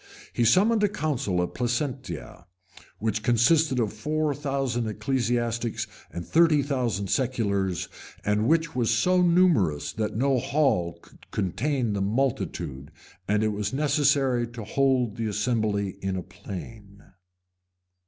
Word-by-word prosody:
He 120 - +1
summoned 210 - +4
a 205 - +4
council 140 - -1
at 90 - -4
Placentia, 120 - -3 0.5
which 110 0 -1
consisted 125 +5 +3
of 110 -3 0
four 150 +6 -1
thousand 135 -5 -2
ecclesiastics 115 +1 -1 0.3
and 85 -1 -6
thirty 160 -3 +4
thousand 125 - -1
seculars; 100 - 0 0.4
and 105 +2 +1
which 165 -1 +1
was 120 -3 +1
so 180 +11 +3
numerous 170 - +3
that 105 -2 -2
no 135 +1 +2
hall 130 - +1
could - - -20
contain 115 - -1
the 100 - -1
multitude, 100 - -2 0.4
and 105 +1 +2
it 110 - +2
was 105 +1 -3
necessary 140 -4 +2
to 115 -1 -8
hold 130 -2 +1
the 115 -1 -2
assembly 105 -2 -1
in 95 0 -2
a 90 - -3
plain. 100 +3 -10
120 Hz, 130 wpm, -26 LUFS, 105-140 Hz, 0.5 s, summoned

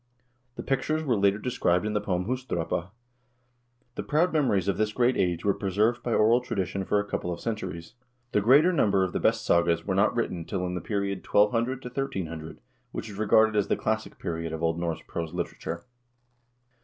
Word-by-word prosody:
The - - -6
pictures 155 +3 0
were 130 -6 +1
later 100 0 +3
described 105 -5 0
in 105 - -1
the 105 - 0
poem 90 -3 -1
"Husdrapa." 100 -8 -2 1.0
The - - -4
proud 165 +4 +1
memories 120 - +2
of 100 - +1
this 105 0 0
great 125 +2 +2
age 90 -4 0
were 100 - +4
preserved 105 +6 0
by 120 - -3
oral 115 +3 +4
tradition 95 -5 -3
for 105 - +2
a 105 - -2
couple 90 -3 -3
of 85 - -4
cen 115 -2 -2
turies; 85 -5 -7 0.4
the 105 - +2
greater 145 - +5
number 100 - +3
of 95 - -2
the - - 0
best - - +1
sagas 85 -1 +2
were 95 - -1
not 100 +5 +2
written 90 -8 -1
till 90 +1 -3
in 90 - -3
the 90 - -3
period 100 0 -2
1200 115 +5 +2
1300, 90 - -5 0.3
which 110 - -5
is 100 - -9
regarded 110 +1 +4
as 105 -2 +2
the - - +1
classic 110 0 -2
period 85 -1 -4
of 80 +1 -5
Old 80 0 +1
Norse 85 -2 -3
prose 85 0 -5
literature. 85 -1 -4
100 Hz, 195 wpm, -27 LUFS, 90-115 Hz, 1.0 s, greater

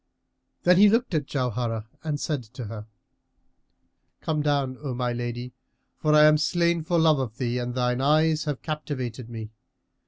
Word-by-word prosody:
Then 180 0 +5
he 205 +2 +7
looked 230 -1 +1
at 150 -3 0
Jauharah 120 -4 -2 0.2
and 150 -2 -2
said 150 -3 -2
to 120 +1 -9
her, 105 0 -8 1.3
"Come 155 -1 -1
down, 140 -3 0
O 135 -4 -4
my 125 -1 -1
lady; 120 +1 -5 0.5
for 155 -1 +3
I 150 - +7
am 155 0 +6
slain 170 +1 +1
for 170 +2 0
love 160 -3 +4
of 120 -4 -4
thee 125 -1 -1
and 120 0 -4
thine 125 0 0
eyes 155 +2 +3
have 145 -3 -3
captivated 130 -6 -4
me. 110 -2 -7
135 Hz, 165 wpm, -25 LUFS, 120-155 Hz, 1.3 s, he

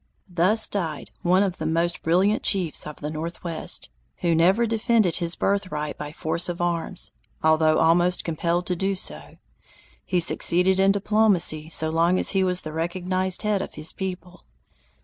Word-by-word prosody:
Thus 190 +6 +3
died 165 -7 -5
one 185 +3 +2
of 185 -3 -3
the 160 - -4
most 170 +2 -1
brilliant 190 +6 +1
chiefs 180 -8 +2
of 150 - -10
the 150 0 -4
Northwest, 165 - -4 0.3
who 170 - +1
never 185 +8 +3
defended 225 -4 +1
his 170 -1 -1
birthright 170 -7 -2
by 150 0 -7
force 165 +2 -2
of 175 - -5
arms, 170 -2 -2 0.3
although 155 0 +3
almost 175 +2 +2
compelled 170 +2 -2
to 180 - -2
do 195 +3 -2
so. 185 - -4 0.7
He 180 - -1
succeeded 180 +2 +4
in 195 0 +4
diplomacy 200 -6 +2
so 160 -1 +2
long 170 +3 +2
as - - +5
he 195 -1 +1
was 180 -1 +2
the 155 - -8
recognized 185 +3 -1
head 210 -2 0
of - - -8
his 155 +1 -1
people. 180 -2 -7
175 Hz, 165 wpm, -23 LUFS, 165-190 Hz, 0.7 s, as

